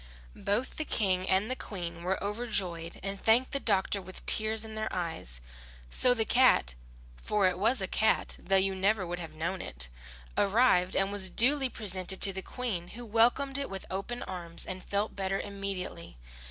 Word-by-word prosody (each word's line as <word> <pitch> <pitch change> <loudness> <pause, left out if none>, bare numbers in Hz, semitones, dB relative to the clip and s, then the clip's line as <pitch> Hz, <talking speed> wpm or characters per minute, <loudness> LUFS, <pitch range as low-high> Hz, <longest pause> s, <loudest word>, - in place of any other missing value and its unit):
Both 210 +6 -1
the 310 - -1
King 190 -9 +1
and 190 +3 +3
the - - 0
Queen 170 -7 -5
were 185 +2 0
overjoyed 195 -6 -2
and 195 0 -4
thanked 235 +4 +3
the 275 - 0
doctor 200 -3 +2
with 185 0 -9
tears 220 0 +2
in 220 - -9
their 215 0 -3
eyes. 160 - -2 0.5
So 250 -1 +4
the 220 -2 0
cat 245 - +4 0.5
for 205 -2 +2
it 180 0 -1
was 220 +1 +2
a - - -1
cat 220 +4 +1
though 195 - 0
you 195 0 +3
never 195 +1 +1
would 175 +1 -4
have 165 -2 -7
known 170 +4 -3
it 60 0 -3 0.5
arrived 195 -4 +3
and 195 +1 +1
was 200 -2 -1
duly 265 +6 +3
presented 190 -4 +1
to 195 - +5
the 190 - -5
Queen, 200 -7 -4
who 240 +6 -9
welcomed 245 +5 +2
it 280 - -3
with 195 0 -6
open 195 +6 -3
arms 170 -2 -6
and 185 0 -6
felt 205 +2 -2
better 195 0 -1
immediately. 195 - -5
195 Hz, 180 wpm, -30 LUFS, 185-220 Hz, 0.5 s, to